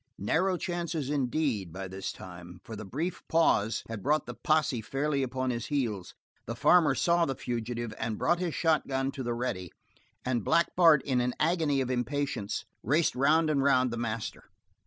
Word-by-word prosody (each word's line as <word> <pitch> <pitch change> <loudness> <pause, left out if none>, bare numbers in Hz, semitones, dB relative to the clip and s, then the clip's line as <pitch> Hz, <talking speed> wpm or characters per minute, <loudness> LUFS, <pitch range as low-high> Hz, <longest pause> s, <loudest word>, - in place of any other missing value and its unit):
Narrow 180 - +1
chances 170 -5 -3
indeed, 130 - 0
by 95 +3 -6
this 95 +1 -5
time, 90 0 -11
for 110 - -8
the 110 - -7
brief 160 - -3
pause 115 -9 +2
had 115 -3 -6
brought 150 +6 +1
the 125 - -6
posse 155 -2 +1
fairly 140 +4 -1
upon 130 0 -1
his 120 -1 -3
heels; 115 -11 -2 0.3
the 115 - -3
farmer 150 +1 +5
saw 170 +4 +3
the 135 - -2
fugitive 120 -1 -4
and 110 -2 -2
brought 175 +1 +2
his 175 -3 -2
shotgun 135 -5 +1
to 135 - -6
the 120 -2 -2
ready; 95 -8 -3 0.5
and 120 -4 0
Black 170 - +2
Bart 165 -5 +6
in 130 -3 +1
an 125 0 -1
agony 155 -4 +2
of 130 -1 -2
impatience 125 -4 -2 0.2
raced 150 +8 +2
round 155 +5 +3
and 140 -2 +2
round 130 -2 +3
the - - -3
master. 115 -1 -4
130 Hz, 180 wpm, -29 LUFS, 115-155 Hz, 0.5 s, Bart